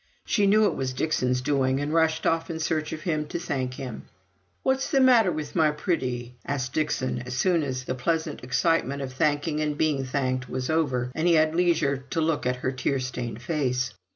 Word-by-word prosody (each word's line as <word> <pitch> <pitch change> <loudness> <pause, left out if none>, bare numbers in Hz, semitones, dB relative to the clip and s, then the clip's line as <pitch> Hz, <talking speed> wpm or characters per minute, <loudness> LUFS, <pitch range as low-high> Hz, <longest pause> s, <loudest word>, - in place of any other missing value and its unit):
She 205 -3 +2
knew 215 +2 +5
it - - +2
was 130 -1 -2
Dixon's 125 -3 0
doing 135 -1 +1
and 145 +2 -2
rushed 160 -1 +2
off 165 0 +1
in 160 -1 -4
search 155 -1 -1
of 155 - -5
him 155 -3 -1
to - - -3
thank 130 -6 -3
him. 130 -4 -7 0.6
"What's 265 0 +1
the 275 - +3
matter 245 -7 +5
with 155 -2 -5
my 160 -3 +4
pretty?" 125 -6 -2
asked 130 -2 -3
Dixon, 150 -5 -1
as 125 0 -6
soon 175 +4 +3
as 130 -3 -3
the 130 - -3
pleasant 160 +3 -2
excitement 140 +1 +1
of 130 -1 -6
thanking 150 +2 0
and 150 -1 -1
being 150 -4 +1
thanked 130 -1 -2
was 130 +3 -2
over, 130 -6 0
and 160 +5 0
he 170 - +5
had 155 0 +3
leisure 165 -5 +2
to - - -1
look 155 -4 0
at 125 - +1
her 130 - +2
tear 135 +1 -1
stained 125 -2 -5
face. 130 -5 -1
145 Hz, 205 wpm, -26 LUFS, 130-160 Hz, 0.6 s, knew